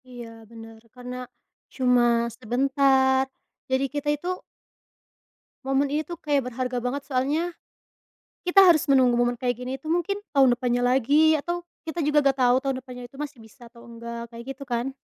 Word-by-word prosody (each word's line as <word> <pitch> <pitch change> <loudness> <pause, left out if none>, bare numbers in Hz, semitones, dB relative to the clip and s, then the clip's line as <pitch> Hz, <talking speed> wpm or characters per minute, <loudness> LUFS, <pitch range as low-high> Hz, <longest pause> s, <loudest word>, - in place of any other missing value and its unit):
Iya 240 -2 -9 0.2
bener, 225 -1 -12
karena, 250 0 -8 0.6
cuma 250 -2 +3 0.3
sebentar. 265 +2 +2 0.4
Jadi 260 +1 +1
kita 295 0 -2
itu 345 - -8 1.4
Momen 270 +1 +1
ini 300 - +1
tuh 345 +2 -8
kayak 285 -6 -1
berharga 250 0 -3
banget, 270 +3 -3
soalnya, 290 +6 -1 0.9
kita 390 +2 +7
harus 345 -2 +5
menunggu 255 -3 +4
momen 240 0 +2
kayak 245 +1 -1
gini 250 +1 -5
itu 310 +3 -9
mungkin 350 +3 0 0.2
tahun 270 -3 +5
depannya 245 0 0
lagi 280 +6 +4
atau 345 +3 -3 0.2
kita 325 +1 -5
juga 300 0 +3
enggak 275 -1 +2
tahu 245 0 +5
tahun 270 -1 -1
depannya 250 -1 -10
itu 270 - -17
masih 295 -3 -6
bisa 230 +3 -16
atau 235 0 -17
enggak, 235 0 -8
kayak 235 0 -9
gitu 275 - -9
kan. 250 +1 -3
265 Hz, 165 wpm, -25 LUFS, 245-290 Hz, 1.4 s, kita